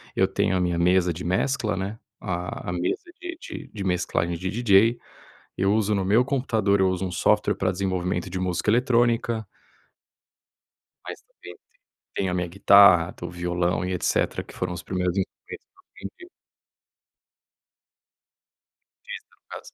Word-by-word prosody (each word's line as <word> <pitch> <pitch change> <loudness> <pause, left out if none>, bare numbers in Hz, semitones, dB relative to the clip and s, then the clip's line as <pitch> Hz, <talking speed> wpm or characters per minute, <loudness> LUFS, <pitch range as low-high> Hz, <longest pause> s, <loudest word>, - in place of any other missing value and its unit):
Eu 95 - +3
tenho 95 0 0
a - - 0
minha 90 -1 0
mesa 90 0 +3
de 85 - -7
mescla, 105 +5 0
né, 100 +4 -4 0.2
a 90 -3 -4
a - - -2
mesa 90 0 -2 0.2
de 345 -1 -6
de - - -8
de 100 -3 -6
mesclagem 90 -2 -1
de 95 +3 -4
DJ. 115 +1 +3 0.6
Eu 95 +2 +2
uso 105 -1 +1
no 100 -2 0
meu 105 +6 +4
computador 110 -7 +1
eu 95 0 +3
uso 95 0 -2
um 90 - -4
software 105 +4 +2
pra 95 -1 0
desenvolvimento 90 -1 -2
de 95 +1 -4
música 90 +1 -1
eletrônica 120 -2 +2 1.6
mas, - - -7
também, 90 - -14
t - - -27 0.6
tenho 95 -2 -1
a - - -2
minha 90 -1 -1
guitarra, 95 -1 +6
t - - -9
o - - -5
violão 90 +1 -1
e 90 - -2
etc. 90 - 0
Que - - -15
foram 90 -1 -3
os 85 - -7
primeiros 90 0 -2
instrumentos 95 - -5
que - - -44
eu - - -23 0.2
aprendi. 365 -1 -15 2.8
Artista, 485 -1 -9
no - - -50
caso. - - -10
95 Hz, 165 wpm, -24 LUFS, 90-105 Hz, 2.8 s, guitarra